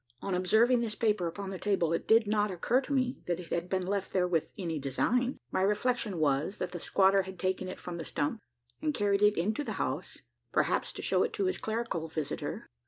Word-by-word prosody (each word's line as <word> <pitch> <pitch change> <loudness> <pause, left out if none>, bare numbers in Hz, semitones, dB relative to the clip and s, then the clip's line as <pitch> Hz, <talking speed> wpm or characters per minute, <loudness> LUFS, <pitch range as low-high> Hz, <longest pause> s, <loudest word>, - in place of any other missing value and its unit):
On 195 - -3
observing 220 +7 +4
this 225 -2 -2
paper 210 -6 +1
upon 195 +3 -5
the 190 - -5
table, 185 -5 +1
it 165 - -2
did 225 0 +6
not 210 0 +1
occur 215 +8 +1
to 275 - -8
me, 255 -2 +1
that 175 -1 0
it 175 - -9
had 170 +1 -1
been 185 -1 0
left 195 0 -2
there 180 -1 +2
with 165 -3 0
any 165 -6 -2
design. 245 - 0
My - - +1
reflection 210 0 +1
was, 150 +4 +1
that 180 - -3
the 175 - -5
squatter 195 +3 +4
had 190 0 -8
taken 185 0 -1
it 185 - -6
from 175 -1 -6
the 165 - -4
stump, 145 +10 -2 0.4
and 305 -2 0
carried 200 -1 +2
it 210 0 +5
into 215 - 0
the - - -4
house - - -3 0.3
perhaps - - +1
to - - -7
shew - - +2
it - - 0
to 400 - 0
his 375 - 0
clerical 220 -7 -2
visitor. 155 -2 -4
195 Hz, 225 wpm, -31 LUFS, 175-220 Hz, 0.4 s, did